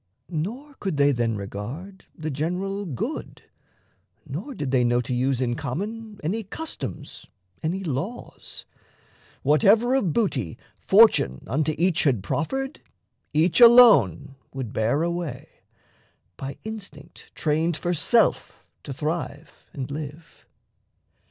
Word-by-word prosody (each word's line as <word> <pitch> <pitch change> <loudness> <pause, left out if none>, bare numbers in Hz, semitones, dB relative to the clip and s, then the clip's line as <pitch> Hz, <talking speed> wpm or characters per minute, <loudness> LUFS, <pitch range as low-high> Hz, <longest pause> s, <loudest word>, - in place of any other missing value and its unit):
Nor 230 - -4
could 190 -7 -2
they 145 0 +5
then 120 -3 0
regard 120 - -7
The 155 -1 -4
general 185 +7 -2
good, 130 -8 -5 0.8
nor 195 - -6
did 140 -8 -3
they 130 -2 +3
know 120 0 +2
to 125 +1 -3
use 130 +1 0
In 120 -2 0
common 215 - -5
any 205 +8 -1
customs, 315 +11 -7 0.3
any 180 +5 -2
laws: 170 - -6 0.8
Whatever 205 - +4
of 220 -11 +2
booty 135 - -1 0.2
fortune 195 - +4
unto 155 +2 0
each 175 0 +2
Had 120 -9 +2
proffered, 265 - -3 0.5
each 165 +9 +3
alone 220 - +7 0.2
would 130 -5 -6
bear 120 +8 +1
away, 170 -6 -3 0.9
By 135 +5 -6
instinct 200 -10 -10
trained 160 +1 0
for 175 +2 -1
self 225 +8 +2 0.3
to 140 - -7
thrive 150 +1 -5
and 135 -1 -6
live. 150 +2 -8
155 Hz, 120 wpm, -24 LUFS, 135-200 Hz, 0.9 s, alone